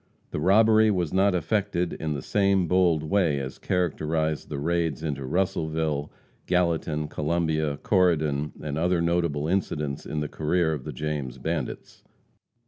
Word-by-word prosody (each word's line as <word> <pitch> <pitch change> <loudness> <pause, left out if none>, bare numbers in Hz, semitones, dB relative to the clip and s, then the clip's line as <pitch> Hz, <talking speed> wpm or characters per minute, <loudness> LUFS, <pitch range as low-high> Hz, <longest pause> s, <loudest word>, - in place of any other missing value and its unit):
The - - -3
robbery 110 +5 +5
was 90 -6 0
not 95 0 +3
effected 90 -1 0
in 80 -1 -3
the 70 - -5
same 100 -3 +2
bold 85 -3 +3
way 80 -3 +2
as 65 -1 -6
characterized 80 -3 -1
the 70 - -4
raids 80 0 -1
into 70 -4 -3
Russellville, 80 -3 -1 0.4
Gallatin, 85 -4 0
Columbia, 80 -1 -1
Corydon 75 -6 +1
and 75 0 -3
other 90 +1 +2
notable 85 -3 0
incidents 75 -6 -2
in 75 - -3
the 75 - -2
career 80 +2 0
of 75 -4 -6
the - - -4
James 75 -5 -4
bandits. 80 -5 -4
80 Hz, 140 wpm, -26 LUFS, 75-90 Hz, 0.4 s, robbery